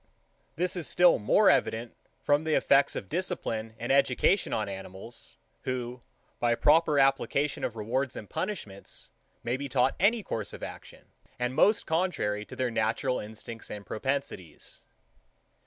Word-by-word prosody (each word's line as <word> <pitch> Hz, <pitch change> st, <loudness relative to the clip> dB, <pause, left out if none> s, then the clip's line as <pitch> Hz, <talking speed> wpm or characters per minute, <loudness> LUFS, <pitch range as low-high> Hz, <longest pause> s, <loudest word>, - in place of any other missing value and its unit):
This 180 Hz, +2 st, 0 dB
is 175 Hz, -4 st, -3 dB
still 180 Hz, 0 st, +5 dB
more 195 Hz, -, +4 dB
evident 115 Hz, +1 st, 0 dB, 0.3 s
from 145 Hz, +1 st, +3 dB
the 160 Hz, -1 st, +1 dB
effects 140 Hz, 0 st, +4 dB
of 95 Hz, -, -5 dB
discipline 115 Hz, -, -3 dB
and 120 Hz, +2 st, -3 dB
education 140 Hz, +7 st, +3 dB
on 105 Hz, -2 st, -1 dB
animals, 95 Hz, +4 st, -9 dB, 0.2 s
who, 125 Hz, -1 st, -4 dB, 0.4 s
by 120 Hz, -1 st, +2 dB
the -, -, -21 dB
proper 155 Hz, 0 st, +4 dB
application 135 Hz, +1 st, +2 dB
of 115 Hz, -, -2 dB
rewards 120 Hz, +5 st, -2 dB
and 105 Hz, -, -7 dB
punishments, 110 Hz, -, -5 dB, 0.3 s
may 120 Hz, +2 st, -1 dB
be 140 Hz, +1 st, -5 dB
taught 130 Hz, 0 st, +2 dB
any 215 Hz, +3 st, +3 dB
course 110 Hz, -, -4 dB
of -, -, -9 dB
action, -, -, -9 dB, 0.3 s
and 125 Hz, +1 st, -1 dB
most 210 Hz, +10 st, +4 dB
contrary 160 Hz, -, 0 dB
to -, -, -10 dB
their 130 Hz, -2 st, -1 dB
natural 115 Hz, +4 st, 0 dB
instincts 110 Hz, +2 st, -8 dB
and 105 Hz, -1 st, -7 dB
propensities. 110 Hz, -, -4 dB
125 Hz, 150 wpm, -29 LUFS, 110-150 Hz, 0.4 s, still